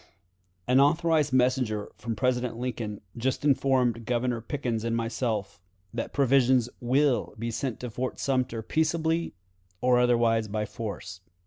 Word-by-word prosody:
"An 125 +1 +4
authorized 155 0 +3
messenger 125 -5 +1
from 115 -1 -4
President 125 -2 0
Lincoln 115 -4 -4
just 130 +4 -1
informed 130 -4 +2
Governor 120 0 -1
Pickens 120 -3 -3
and 115 0 0
myself 115 -6 -2 0.3
that 115 - -3
provisions 130 -3 +3
will 130 +2 +1
be 115 +2 -3
sent 120 0 -3
to 125 -2 -5
Fort 125 +3 -3
Sumter 125 -4 -1
peaceably, 160 +2 0 0.4
or 125 -1 +3
otherwise 115 -2 +3
by 105 +1 -2
force. 100 -3 -6
125 Hz, 130 wpm, -27 LUFS, 115-135 Hz, 0.4 s, An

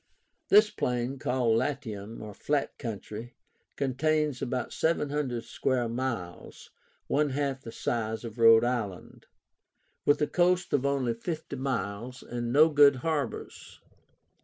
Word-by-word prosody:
This 210 +1 +6
plain, 125 +2 -2
called 120 -4 +2
LATIUM 110 -6 -4
(flat 145 -1 -1
country), 115 0 -6 0.4
contains 145 +1 0
about 125 0 -3
700 145 -6 0
square 125 -3 -1
miles 115 -7 -5 0.3
(one 150 +1 +1
half 135 -1 -2
the 115 - -8
size 110 -1 -2
of 115 0 -8
Rhode 115 0 +7
Island), 115 -7 -4 0.8
with 145 - +3
a 150 - +3
coast 180 +2 +1
of 140 -1 +2
only 135 -4 0
fifty 155 +5 -5
miles, 125 -2 -3
and 120 -1 -4
no 155 +5 +6
good 145 -2 +6
harbors. 155 -4 -3
130 Hz, 120 wpm, -28 LUFS, 115-145 Hz, 0.8 s, Rhode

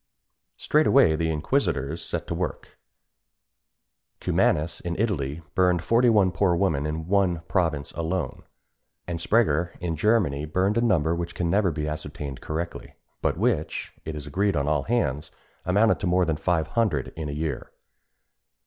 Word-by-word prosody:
Straightway 140 - +4
the 80 +1 0
inquisitors 80 - -1
set - - -4
to - - -4
work: - - -5 1.4
Cumanus, 75 +3 +1
in 85 -1 -4
Italy, 85 -8 -1
burned 90 -2 +2
forty 120 +1 +4
one 100 -5 +4
poor 90 0 +2
women 80 -6 +1
in 80 +1 -4
one 95 -4 +2
province 80 -5 -1
alone; 85 -3 -3 0.6
and 85 -1 -4
Sprenger, 85 -6 +2
in 85 -2 -2
Germany, 80 -6 +1
burned 95 +8 +1
a - - +1
number 85 -9 +2
which 85 0 -4
can 85 -1 -1
never 100 -1 +3
be 75 -1 -3
ascertained 75 -3 -6
correctly, 85 +2 -5 0.3
but - - 0
which, 100 -7 -1
it 80 - -5
is 75 -1 -6
agreed 95 +7 0
on 70 -1 0
all 75 -1 +2
hands, 80 - 0 0.4
amounted 105 +5 +3
to 100 - -2
more 90 +1 +3
than 80 -2 0
five 80 0 0
hundred 105 - 0
in 80 -2 -4
a - - -4
year. 75 +1 -4
85 Hz, 155 wpm, -25 LUFS, 75-100 Hz, 1.4 s, Straightway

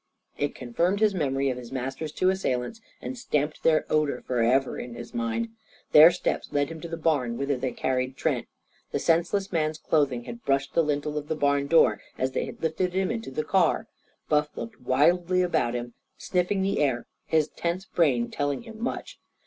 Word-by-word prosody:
It 145 0 -2
confirmed 170 +11 0
his 215 -2 +3
memory 135 -5 0
of 125 - -5
his 120 -2 -10
master's 135 +4 -4
two 185 +4 +2
assailants, 190 - -2 0.2
and 260 - -4
stamped 155 - -1
their 155 -1 +3
odour 150 -4 +1
for 125 -2 0
ever 130 +3 +2
in 120 -1 -7
his - - -9
mind. 230 -1 -1 0.4
Their 155 +2 +10
steps 180 - -2
led 145 -1 +1
him 165 -1 -8
to 170 - -5
the 165 0 -5
barn 145 -8 0
whither 140 0 0
they 130 +1 -2
had - - -12
carried 130 0 -1
Trent. - - -1 0.4
The - - 0
senseless 180 +4 +1
man's 155 -2 0
clothing 140 -6 +1
had 235 - -9
brushed 135 0 0
the - - +4
lintel 150 0 -1
of 145 - -10
the 160 - -1
barn 140 -1 +1
door 165 +3 +4 0.2
as 130 +1 0
they - - -1
had - - -10
lifted 175 +3 0
him 190 +2 +1
into 230 -1 -4
the 145 +4 -2
car. 190 +2 +2 0.4
Buff 150 0 +2
looked 225 -1 -7
wildly 175 +7 +3
about 120 -9 +1
him, 120 0 -4 0.2
sniffing 185 +2 0
the 195 +1 0
air, 130 -5 +1 0.2
his 155 -1 +2
tense 175 +3 -3
brain 130 -11 +1
telling 145 +6 -2
him 225 -1 -11
much. 245 - -4
150 Hz, 195 wpm, -26 LUFS, 135-180 Hz, 0.4 s, Their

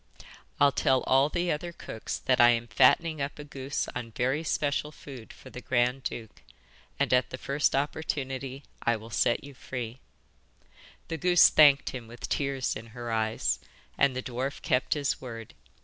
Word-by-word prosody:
I'll 140 0 +6
tell 130 -1 +2
all 135 +2 +3
the 175 +2 -1
other 170 +3 -3
cooks 110 -8 -6
that 130 -1 +2
I 120 - +8
am 120 -1 +2
fattening 140 +7 +3
up 140 +1 -3
a 150 - -7
goose 140 -1 -4
on 120 -2 -5
very 130 +7 -1
special 150 -1 -1
food 130 -7 -11
for - - -14
the 125 - -8
grand 125 +2 +1
duke, 115 -4 -6 0.6
and - - +2
at 125 0 +3
the 130 - -6
first 140 +3 0
good - - +2
opportunity 135 -2 -3 0.2
I 120 - +2
will 110 +1 -10
set 120 - +1
you 140 0 -10
free.' 125 -2 -6 1.1
The 165 - -3
goose 175 +1 +6
thanked 145 -2 +6
him 120 -3 -7
with 120 +1 -8
tears 135 -3 -1
in 110 +2 -8
her 120 -1 -4
eyes, 110 0 0 0.4
and 130 - +2
the 130 - -3
dwarf 130 +2 -4
kept 125 +4 +1
his 145 -2 -1
word. 115 -3 -8
130 Hz, 180 wpm, -28 LUFS, 120-145 Hz, 1.1 s, I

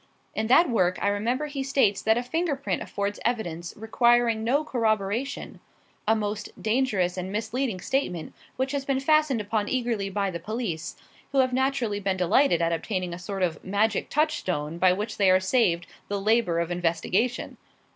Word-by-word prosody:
In 220 - -1
that 295 +9 +6
work 185 -8 +2
I 200 - +1
remember 235 +8 0
he 290 -2 -4
states 270 -7 +2
that 220 +1 +3
a 240 - -1
finger 325 +4 -1
print 275 - -3
affords 200 0 -3
evidence 175 -8 -2
requiring 230 +1 +2
no 275 +7 +2
corroboration 225 0 -1 0.5
a 220 - +4
most 210 -1 -3
dangerous 215 -6 +1
and 185 +1 -4
misleading 220 0 -2
statement 180 - -2 0.2
which 265 +1 -1
has 280 -1 -2
been 275 -1 0
fastened 300 -4 +3
upon 210 0 -1
eagerly 235 -6 -1
by 200 0 -1
the 170 - -5
police, 200 -4 -4 0.4
who - - 0
have 255 -1 +3
naturally 255 -5 0
been 195 -1 -1
delighted 180 - +3
at 165 0 +1
obtaining 180 0 -2
a 170 - -6
sort 195 +1 -3
of 165 -4 -1
magic 205 +2 0
touchstone 180 - -1
by 185 0 +5
which 210 +4 -3
they 195 -2 +4
are 185 0 +6
saved 185 -4 +2 0.2
the 200 0 -2
labour 210 -4 +2
of 170 +1 -2
investigation. 175 +7 -1
215 Hz, 175 wpm, -26 LUFS, 185-255 Hz, 0.5 s, that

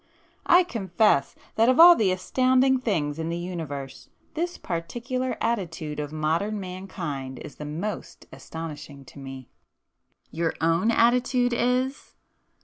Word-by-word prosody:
I 355 +1 +7
confess, 210 - +1 0.2
that 225 +2 +5
of 255 - +3
all 345 -5 +9
astonishing 255 +7 +2
things 160 -11 -1
in 160 0 -2
the 170 - -2
Universe, 160 -6 -6 0.2
this 345 +2 -3
particular 240 +9 -3
attitude 165 -9 -2
of 145 0 -4
modern 165 +7 -1
mankind 175 -8 -6
is 145 - -10
the 150 - -7
most 170 +8 -5
astonishing 150 -4 -8
to 140 - -13
me!" 135 -2 -9 0.8
"Your 165 0 -1
own 165 +7 +2
attitude 245 +1 +3
is? 255 +3 -1
185 Hz, 125 wpm, -25 LUFS, 155-245 Hz, 0.8 s, all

